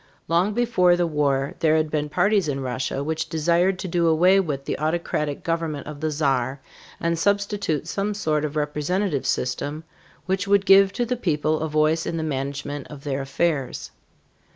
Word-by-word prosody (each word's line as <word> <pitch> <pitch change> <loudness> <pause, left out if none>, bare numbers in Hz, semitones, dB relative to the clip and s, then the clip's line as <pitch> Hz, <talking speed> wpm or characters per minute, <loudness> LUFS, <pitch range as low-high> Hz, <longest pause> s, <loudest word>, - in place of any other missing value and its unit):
Long 180 +6 +1
before 230 -7 +3
the 175 0 +1
war 140 -3 0
there 155 -1 +3
had 155 -1 0
been 150 -1 -1
parties 200 +2 +2
in 140 -2 -2
Russia 130 +1 -2
which 160 +2 -3
desired 170 +4 +2
to 190 - -5
do 170 -1 +1
away 180 +4 +5
with 145 -7 -2
the - - -3
autocratic 155 -2 -2
government 165 -3 -2
of 150 -1 -8
the 155 +1 -1
Czar 135 -3 0 0.4
and 170 0 0
substitute 200 -5 0
some 200 +4 -2
sort 155 -6 0
of 150 0 -3
representative 150 +2 -1
system 145 +5 -2 0.4
which 190 +1 -1
would 200 0 +3
give 195 0 +6
to 240 - -1
the 250 +2 -1
people 155 -7 0
a 160 - -2
voice 155 +2 +1
in 165 - -2
the 160 - -2
management 140 -1 -4
of 145 -2 -11
their 140 -1 -2
affairs. 135 -1 -2
155 Hz, 175 wpm, -23 LUFS, 145-180 Hz, 0.4 s, give